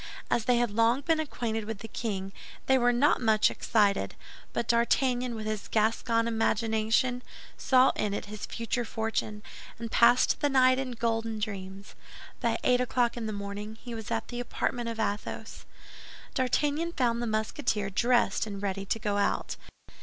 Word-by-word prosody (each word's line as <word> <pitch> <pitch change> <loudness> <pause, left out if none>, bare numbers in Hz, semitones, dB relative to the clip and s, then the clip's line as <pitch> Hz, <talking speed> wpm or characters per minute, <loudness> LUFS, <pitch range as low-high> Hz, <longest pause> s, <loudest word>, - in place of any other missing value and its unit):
As 230 - +1
they 245 -1 +3
had 240 -2 +1
long 230 +5 +3
been 320 +2 +1
acquainted 230 -8 -3
with 220 0 -5
the 225 - -6
king, 195 -4 -4 0.3
they 265 - +4
were 245 0 +4
not 260 +3 +3
much 220 -2 +4
excited; 205 -3 +1 0.4
but 235 - -2
D'Artagnan, 245 +1 +2
with 215 -1 -5
his 215 -1 -3
Gascon 230 +1 +1
imagination, 225 +2 +1 0.3
saw 260 0 +4
in 210 - -1
it 205 - -3
his 210 0 -7
future 235 +1 -2
fortune, 220 -2 -3 0.3
and 230 -1 -6
passed 240 +2 +4
the 290 - +3
night 255 -1 +4
in 260 -2 -3
golden 225 -1 -1
dreams. 195 -2 -6 0.5
By - - 0
eight 250 0 +3
o'clock 245 -1 +1
in 230 -2 -4
the - - -2
morning 205 +1 -6
he 240 - -8
was 225 -2 -6
at - - -2
the 240 - -5
apartment 240 0 -2
of 225 -1 -5
Athos. 205 -1 -4 0.7
D'Artagnan 295 +6 0
found 235 -4 +1
the 240 - -2
Musketeer 215 -1 -1
dressed 235 0 +2
and 200 -2 -5
ready 195 0 -3
to - - 0
go 210 -2 -1
out. 200 - 0
230 Hz, 170 wpm, -29 LUFS, 215-245 Hz, 0.7 s, they